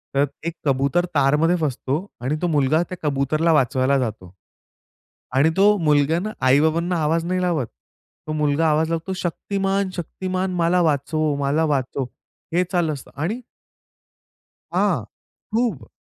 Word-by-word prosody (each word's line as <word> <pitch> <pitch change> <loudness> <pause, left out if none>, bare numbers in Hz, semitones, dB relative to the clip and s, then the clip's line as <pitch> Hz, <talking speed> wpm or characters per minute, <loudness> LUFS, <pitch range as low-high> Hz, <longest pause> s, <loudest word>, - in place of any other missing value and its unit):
तर 140 +1 +4 0.2
एक 170 - -2
कबूतर 140 +5 +2
तारमध्ये 150 +5 +3
फसतो 145 +3 -1 0.2
आणि 130 +5 -1
तो 175 - +1
मुलगा 150 0 +2
त्या 185 - -6
कबूतरला 150 +4 +1
वाचवायला 135 -1 +2
जातो 110 -7 -4 1.0
आणि 140 +4 +5
तो 205 +2 +6
मूलग्यान 160 +2 +2
आई-बाबांना 160 +7 +3
आवाज 165 +2 +1
नाही 185 +1 0
लावत, 165 -9 0 0.6
तो 155 - -2
मुलगा 150 +1 +1
आवाज 155 +1 +2
लावतो, 165 +3 -2
"शक्तिमान, 195 +2 -1
शक्तिमान, 185 +2 -3
मला 175 +1 +2
वाचव, 155 0 +1
मला 145 +3 +1
वाचव," 135 -2 -1 0.5
हे 180 +2 +3
चालू 175 -4 +1
असतं 140 - -10
आणि 215 +10 -2 1.3
हां, - - +2 0.5
खूप 225 - 0
155 Hz, 130 wpm, -22 LUFS, 140-175 Hz, 1.3 s, तो